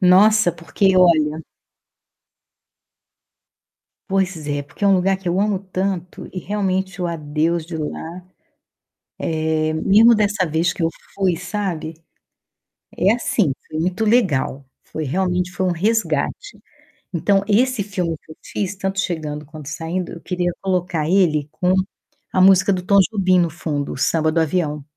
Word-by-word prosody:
Nossa, 195 +2 +5
porque 185 +3 +1
olha 160 -3 +4 2.7
Pois 190 -5 -1
é, 145 -1 -2
porque 145 +8 -7
é - - +5
um 195 - +5
lugar 190 +1 +2
que 190 -1 -16
eu 180 +3 +1
amo 205 -2 +1
tanto 185 -2 -4
e 185 - -6
realmente 190 0 -2
o 180 - 0
adeus 160 +1 -1
de 165 +1 -8
lá, 165 +3 -6 1.3
eh, 155 0 +1
mesmo 215 +8 +5
dessa 205 -3 +1
vez 160 +2 0
que 170 - -4
eu 165 - +2 0.3
fui, 190 -3 +1
sabe, 180 -3 -4 1.0
é 195 - +3
assim, 215 - +1 0.2
foi 155 - -4
muito 185 +6 -1
legal, 170 - +1 0.2
foi 155 - -6
realmente 180 +4 -1
foi 190 0 -2
um 180 - +2
resgate. 225 - -1 0.5
Então, 195 +4 +2
esse 235 +1 +2
filme 180 -5 -3
que 155 - -13
eu - - -11
fiz, 200 -1 -3
tanto 195 0 -3
chegando 155 -4 -3
quanto 150 -1 -11
saindo, 170 +3 -4
eu 170 - -8
queria 180 -1 -1
colocar 180 -5 -1
ele 165 -6 +2
com 180 +3 +1 0.6
a 185 - +3
música 195 +1 +6
do 180 - -2
Tom 200 +2 +3
Jobim 185 -4 +3
no 170 -1 +2
fundo, 150 -3 -3
o - - -7
Samba 155 +3 +1
do 165 - +1
Avião. 150 -3 -1
180 Hz, 150 wpm, -20 LUFS, 160-195 Hz, 2.7 s, música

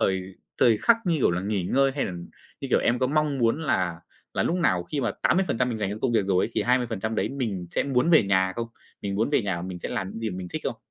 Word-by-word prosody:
thời 95 -1 +1 0.4
thời 115 -3 +5
khắc, 235 - +4
như 170 -2 +2
kiểu 125 - +3
là, 85 +1 -1
nghỉ 100 0 -1
ngơi, 135 +8 +3
hay 145 - 0
là, - - -4 0.5
như - - -5
kiểu, - - +5
em 120 - +1
có 130 - +2
mong 150 0 +1
muốn 120 +5 +2
là 90 - 0 0.3
là - - +1
lúc 175 - 0
nào 90 - +2
khi 145 +10 -3
mà 120 -4 0
80% 130 -10 +2
mình 115 -3 -3
dành 100 -2 -1
cho 105 - -4
công 130 - +1
việc 105 -4 +2
rồi 95 -2 +2
ấy - - -4
thì - - +1
20% 115 -3 0
đấy - - 0
mình 110 -10 -3
sẽ - - 0
muốn 140 +3 +1
về 160 -7 +7
nhà 95 -1 +2
không? 115 0 -2 0.4
Mình 100 -1 -2
muốn 110 +6 0
về 145 - +2
nhà 90 -4 -2
mình 90 0 -6
sẽ - - -5
làm 95 0 -3
những 115 - -7
gì 110 -1 -2
mà 90 - -6
mình 90 -1 -6
thích - - -4
không? - - -2
115 Hz, 285 wpm, -26 LUFS, 95-135 Hz, 0.5 s, về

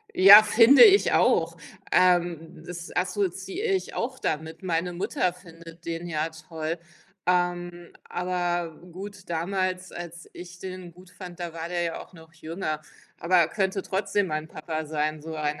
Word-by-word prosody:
Ja, 200 +3 +10
finde 230 - +7
ich 405 -2 +5
auch. - - +2 0.3
Ähm, 175 -2 +2
das 175 -1 -8
assoziiere 190 - -2
ich 375 - -3
auch 260 +3 -3
damit. 160 +4 -3
Meine 175 0 -1
Mutter 180 0 -1
findet 165 -2 -15
den 170 +1 -4
ja 155 -1 -1
toll. 160 +1 -6 0.5
Ähm, 175 -1 -1
aber 175 -2 -2 0.2
gut, 195 0 -9
damals, 185 +2 -2
als 170 -1 -9
ich 175 0 -10
den 185 -2 -8
gut 180 +1 -17
fand, 180 -2 -11
da 170 -2 -5
war 165 0 -5
der 175 -1 -1
ja 165 -1 -3
auch - - -18
noch 165 -1 -16
jünger. 160 -1 -4 0.4
Aber 170 -1 +3
könnte 195 +1 -1
trotzdem 195 +1 -1
mein 155 0 -4
Papa 155 0 -5
sein, 155 0 -2
so 160 - -7
rein 150 -1 -2
175 Hz, 155 wpm, -26 LUFS, 165-185 Hz, 0.5 s, Ja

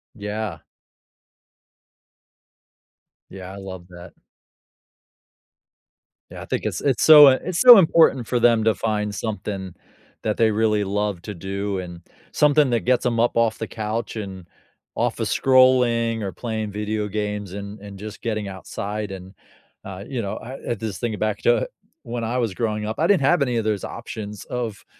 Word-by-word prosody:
Yeah. 105 -5 -5 2.7
Yeah, 95 -1 -9
I - - -9
love 95 -2 -9
that. 90 0 -12 2.2
Yeah, - - -9
I - - -8
think - - -3
it's - - -2
it's 135 -5 +1
so, 150 -2 +10
uh, 130 -1 +5
it's 180 -1 -2
so 245 -3 +11
important 160 -8 +4
for 125 - 0
them 115 -2 +4
to 110 - +3
find 105 -2 -2
something 100 -3 -5 0.5
that 105 -1 -2
they 110 -1 +3
really 105 -1 +1
love 100 -2 -2
to 105 - -6
do 95 +2 -4
and 90 -1 -8 0.3
something 150 -2 +4
that 120 -1 +1
gets 125 0 +1
them 115 -2 0
up 120 - +2
off 115 -1 +2
the 110 - -5
couch 110 +1 -4
and 95 -4 -7 0.5
office - - -1
scrolling 125 -3 +3
or 95 -2 -3
playing 110 -3 -4
video 105 0 -3
games 105 -2 -4
and 100 +1 -7
and 100 -1 -10
just 105 +1 -9
getting 110 -3 -3
outside, 100 +2 -5
and, 95 0 -9 0.5
uh, 95 0 -7
you 130 -4 -3
know, 100 - -4
I 125 -1 -5
this 110 -3 -5
thing 115 -3 -3
back 110 -1 -1
to 120 - +2 0.4
when 115 0 -5
I 120 +3 -2
was 115 -5 -1
growing 105 0 -2
up, 110 +5 -5
I 165 - +2
didn't 200 -7 +3
have 145 +3 +3
any 125 -3 +1
of 115 - 0
those 105 -2 -1
options 105 -3 -7
of, 120 -4 -5
110 Hz, 165 wpm, -22 LUFS, 100-120 Hz, 2.7 s, so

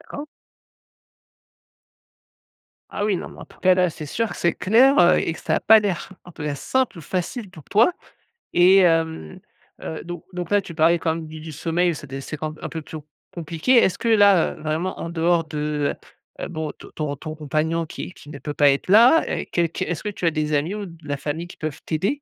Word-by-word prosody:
D'accord. 290 - -8 2.6
Ah 205 - -3
oui, 205 -2 +1
non, - - -6
mais - - -13
en - - -8
tout - - -21
cas, 185 0 +5
là, 180 -1 +2
c'est 155 -1 -8
sûr 225 +9 -2
que - - -7
c'est 170 - +1
clair, 250 +8 +4
heu, 175 0 +6
et 165 - -1
que - - -11
ça - - 0
a - - -1
pas 220 0 +7
l'air 190 -7 -2
en 175 - -13
tout 160 - -9
cas, 150 -1 -2
simple 245 - -1
ou - - -7
facile 185 - -4
pour 160 -5 -14
toi. 225 - +4 0.6
Et, 180 +2 +6
hem 165 - +1 0.4
heu, 160 - -6
donc 175 -1 -7
donc 175 -1 -5
là, 205 0 +4
tu 175 - -10
parlais 165 +2 +3
quand 160 -1 0
même 165 -1 -6
du 155 0 -9
du 160 0 -8
sommeil, 170 +3 0
c'est 150 - -9
des 135 +1 -6
c'est 155 +3 -6
quand 155 +1 -5
un - - -4
peu 160 -1 -5
pio 155 0 -9 0.3
compliqué. 170 - 0
Est-ce 190 -6 +4
que - - -4
là, 205 -6 +5
heu, - - -14
vraiment, 160 +4 -2
en 165 - -4
dehors 170 0 +2
de, 150 -1 -2 0.5
heu, - - -3
heu, - - -5
bon, 160 -3 -4 0.2
ton 145 -2 -3
ton 155 +3 -7
compagnon 155 +2 -1
qui 170 - -8
qui 145 - -15
ne 145 -2 -8
peut 145 +2 -5
pas 145 -1 +5
être 140 - -2
là, 235 - +7
et - - -3
qu 170 -1 +1
qu 165 - -4
est-ce 170 - -4
que 210 - -2
tu 190 - -5
as 165 - +4
des 155 -1 -2
amis 150 +6 0
ou 210 -1 -5
de 165 -3 -13
la 145 0 -2
famille 155 +5 -4
qui - - -13
peuvent 155 -3 -5
t'aider? 200 - -1
165 Hz, 235 wpm, -22 LUFS, 155-185 Hz, 2.6 s, pas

